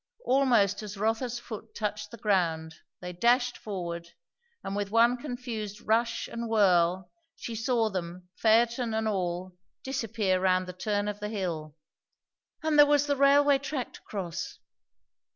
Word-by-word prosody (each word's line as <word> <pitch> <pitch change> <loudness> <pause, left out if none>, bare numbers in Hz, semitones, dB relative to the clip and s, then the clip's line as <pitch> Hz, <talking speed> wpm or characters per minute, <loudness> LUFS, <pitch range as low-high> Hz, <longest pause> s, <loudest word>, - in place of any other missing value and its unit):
Almost 240 -7 +3
as 210 -1 -7
Rotha's 225 +4 -1
foot 230 -3 -9
touched 210 -1 -3
the 235 - -10
ground 170 -7 0 0.3
they 180 0 -6
dashed 245 +6 +2
forward, 170 -4 -5 0.5
and 195 - -4
with 205 -1 -2
one 230 +3 +4
confused 240 -6 -5
rush 230 +1 0
and 235 0 -5
whirl 185 -4 +3 0.2
she 235 - -6
saw 225 0 +1
them, 180 -2 -5
phaeton 235 +1 +2
and 220 0 0
all, 180 -2 -2 0.3
disappear 225 -7 0
round 185 -1 +2
the 180 - -7
turn 205 +2 -1
of 205 0 -4
the 210 0 -4
hill. 165 -8 -4 0.9
And 310 -1 +2
there 290 - +9
was 290 0 +3
the 285 -1 +1
railway 280 0 +5
track 280 -3 -4
to - - -13
cross! 185 -5 -5
215 Hz, 150 wpm, -28 LUFS, 185-240 Hz, 0.9 s, there